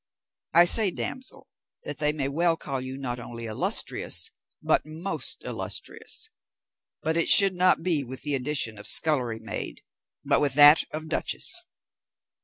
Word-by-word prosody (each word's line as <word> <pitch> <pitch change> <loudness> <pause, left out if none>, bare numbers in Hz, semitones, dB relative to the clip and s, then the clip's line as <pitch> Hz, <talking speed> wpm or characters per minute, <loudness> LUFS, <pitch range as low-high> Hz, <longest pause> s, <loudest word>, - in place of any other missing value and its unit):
I 170 +1 +7
say, 205 +3 +5
damsel, 260 +8 -6 0.4
that 145 -2 -6
they 150 0 +1
may 145 -3 -3
well 165 +4 0
call 135 -4 -5
you 130 +1 -7
not 125 -3 -5
only 115 -1 -8
illustrious, 110 -1 +1 0.3
but - - +1
most 160 +6 -3
illustrious: - - -4 0.8
but 160 +1 -1
it 170 - +1
should 195 -1 +7
not 180 -2 +2
be 165 -5 0
with 130 +1 -8
the 145 - +1
addition 130 -5 -2
of 105 - -6
scullery 125 -8 +1
maid, 110 0 -7 0.4
but - - +2
with 140 -3 0
that 145 +2 +7
of 155 +1 -7
duchess." 160 - -2
150 Hz, 150 wpm, -25 LUFS, 130-165 Hz, 0.8 s, I